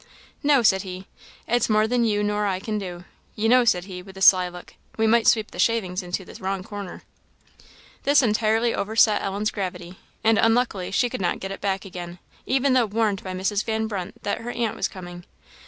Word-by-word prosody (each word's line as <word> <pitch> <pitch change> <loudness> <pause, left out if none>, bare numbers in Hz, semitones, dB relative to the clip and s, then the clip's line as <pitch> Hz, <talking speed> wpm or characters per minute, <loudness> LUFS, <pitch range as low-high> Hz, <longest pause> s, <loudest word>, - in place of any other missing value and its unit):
"No," 285 -4 +4
said 190 -3 +4
he; 185 -1 -8 0.4
"it's 240 0 +1
more 215 0 +3
than 245 +1 +1
you 210 -2 +1
nor 210 0 0
I 185 -2 -1
can 215 +2 -3
do. 180 -2 -7 0.3
You 215 +1 0
know," 250 +1 +5
said 180 -6 +2
he, 185 -2 -8
with 190 +1 -13
a - - -9
sly 185 -2 +6
look, 175 0 -12 0.2
"we 225 - +2
might 225 +1 +3
sweep 220 -2 +4
up - - -29
the - - -10
shavings 200 -5 +1
into 180 +1 -4
the - - -12
wrong 190 0 -2
corner!" 200 -2 -8 1.0
This 285 0 +4
entirely 225 +1 +2
overset 215 +1 +2
Ellen's 200 +2 -2
gravity, 180 -2 -6 0.2
and 225 -1 +4
unluckily 225 -5 +1
she 200 +5 +1
could 235 - -5
not 175 - -1
get 195 - -5
it 195 - -7
back 195 0 -1
again, 175 -2 -8 0.3
even 270 +1 +2
though 250 -3 +3
warned 210 -2 0
by 185 - -5
Mrs. 195 +2 -1
Van 220 -1 -1
Brunt 195 -5 -6
that 205 - -2
her 235 - -6
aunt 235 -2 -2
was - - -1
coming. 175 -1 -10
205 Hz, 210 wpm, -24 LUFS, 185-225 Hz, 1.0 s, sly